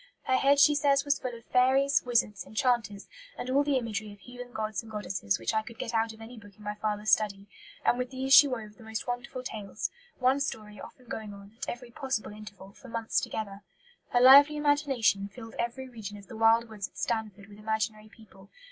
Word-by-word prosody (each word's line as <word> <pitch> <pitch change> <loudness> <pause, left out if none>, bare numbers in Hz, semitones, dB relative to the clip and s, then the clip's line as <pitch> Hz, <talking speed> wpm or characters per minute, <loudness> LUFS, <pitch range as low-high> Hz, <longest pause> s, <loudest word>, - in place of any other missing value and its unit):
Her 260 - +1
head, 280 +1 +4
she 295 +1 +7
says, 280 -1 +2
was 285 0 +1
full 250 -2 -5
of 230 - -18
"fairies, 265 +2 +3
wizards, 220 -6 +1
enchanters, 220 -3 -1 0.3
and 255 - -4
all 280 +2 +4
the 285 -2 +1
imagery 220 -3 -4
of 205 - -14
heathen 245 +3 -10
gods 215 -1 -3
and 225 -1 -14
goddesses 190 - -2
which 115 - -2
I 220 - +2
could 225 +1 -12
get 230 - -5
out 225 0 +1
of 220 0 -14
any 230 +1 -10
book 205 -2 -16
in 210 - -15
my 210 0 -3
father's 210 0 -2
study," 200 -2 +1 0.4
and 245 - +3
with 250 0 -2
these 265 +1 0
she 290 0 +10
wove 220 -5 -6
the 230 - -14
most 220 0 -5
wonderful 250 +1 -5
tales, 215 -3 -5 0.3
one 260 +2 +2
story 210 -6 -5
often 255 - -13
going 215 -3 -6
on, 200 +2 -14
at - - -5
every 240 0 -7
possible 265 -5 -3
interval, 205 -2 -11
for 260 - -15
months 230 -1 -1
together. 200 -2 -5 0.5
Her 245 - +2
lively 285 +4 +8
imagination 280 -9 +2
"filled 225 +2 -11
every 240 +3 -3
region 215 -4 -8
of 200 - -13
the 225 - -11
wild 225 +1 +4
woods 210 -3 -6
at - - -23
Stanford 215 -4 -3
with 205 0 -14
imaginary 215 0 -2
people. 200 -3 -18
225 Hz, 215 wpm, -29 LUFS, 210-255 Hz, 0.5 s, she